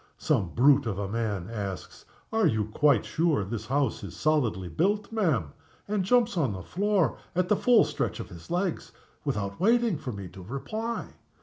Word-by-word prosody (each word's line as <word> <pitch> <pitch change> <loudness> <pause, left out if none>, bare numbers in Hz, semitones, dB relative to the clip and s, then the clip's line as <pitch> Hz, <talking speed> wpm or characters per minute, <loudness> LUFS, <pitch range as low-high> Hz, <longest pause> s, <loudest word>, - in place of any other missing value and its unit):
Some 90 - +1
brute 140 +1 +5
of 100 -4 -2
a 100 -1 -2
man 105 -4 -2
asks, 100 -4 -6 0.3
'Are 220 -4 +4
you 110 -7 +1
quite 125 +2 +3
sure 160 -9 +1
this 110 +1 -5
house 135 -4 0
is 90 -4 -7
solidly 115 - +1
built, 200 - 0
ma'am?' 155 - 0 0.3
and 205 -1 0
jumps 235 +2 +3
on 135 -10 +1
the 95 -2 -6
floor 200 - +1 0.2
at 180 0 +1
the 210 - +5
full 240 -1 +5
stretch 150 -4 -2
of 115 - -6
his 85 -2 -12
legs, 180 0 -2 0.3
without 100 -1 -2
waiting 230 -4 +3
for 130 - -5
me 100 -3 -7
to 95 +1 -11
reply. 215 - -4
140 Hz, 180 wpm, -28 LUFS, -, 0.3 s, brute